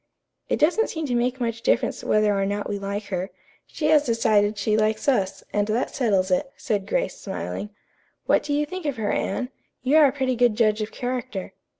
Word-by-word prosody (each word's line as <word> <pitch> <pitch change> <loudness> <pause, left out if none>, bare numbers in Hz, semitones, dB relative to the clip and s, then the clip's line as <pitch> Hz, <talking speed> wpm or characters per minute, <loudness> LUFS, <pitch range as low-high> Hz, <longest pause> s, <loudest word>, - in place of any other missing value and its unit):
"It - - +1
doesn't 360 +9 +3
seem 320 -1 -3
to 255 - -2
make 245 +2 0
much 230 -2 -2
difference 235 - +1
whether 215 -1 +3
or 195 - +1
not 205 +1 -2
we 205 -1 -3
like 200 +1 -3
her. 185 0 -2 0.4
She 305 - -4
has 305 -2 +5
decided 215 -4 +2
she 210 +1 +1
likes 215 +4 +1
us, 200 -9 +1
and 205 0 +1
that 225 +4 -1
settles 200 -7 +1
it," 270 +9 +1
said 205 -3 -2
Grace, - - -1
smiling. 210 - -5 0.6
"What - - +3
do 295 - -5
you 295 +1 +2
think 370 0 -5
of 280 -4 -2
her, 210 -2 -1
Anne? 250 +5 -1 0.3
You 275 +4 +4
are 305 -2 +8
a - - +1
pretty 260 -2 -1
good 240 -2 +3
judge 215 -1 +2
of 215 - -3
character." 245 -6 -4
230 Hz, 210 wpm, -24 LUFS, 205-265 Hz, 0.6 s, are